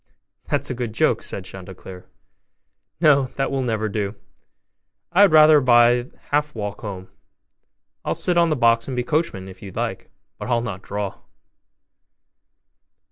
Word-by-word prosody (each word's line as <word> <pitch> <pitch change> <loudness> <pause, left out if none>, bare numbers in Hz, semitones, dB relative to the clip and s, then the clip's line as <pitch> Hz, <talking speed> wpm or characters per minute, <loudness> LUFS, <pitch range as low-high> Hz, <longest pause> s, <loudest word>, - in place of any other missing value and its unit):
'That's - - -1
a - - -1
good 120 -3 -5
joke!' - - +2
said 95 - -6
Chanticleer; 95 -1 -11 0.9
'no, 145 -4 +4
that 135 0 -1
will 135 -1 -1
never 110 -3 -1
do; 105 0 -3 1.0
I 180 +3 +4
had 205 - +7
rather 155 -1 +7
by 120 -1 +4 0.2
half 150 0 0
walk 105 -2 -5
home; 95 -3 -7 1.0
I'll - - -1
sit 180 - 0
on 170 -1 +4
the 155 - +1
box 115 -3 +2
and 130 -2 -4
be 125 - 0
coachman, 150 - -2
if 95 - -13
you 100 - -9
like, - - -4 0.3
but - - -6
I'll 120 -1 +2
not 100 -5 -5
draw. 100 0 -5
120 Hz, 150 wpm, -22 LUFS, 100-145 Hz, 1.0 s, had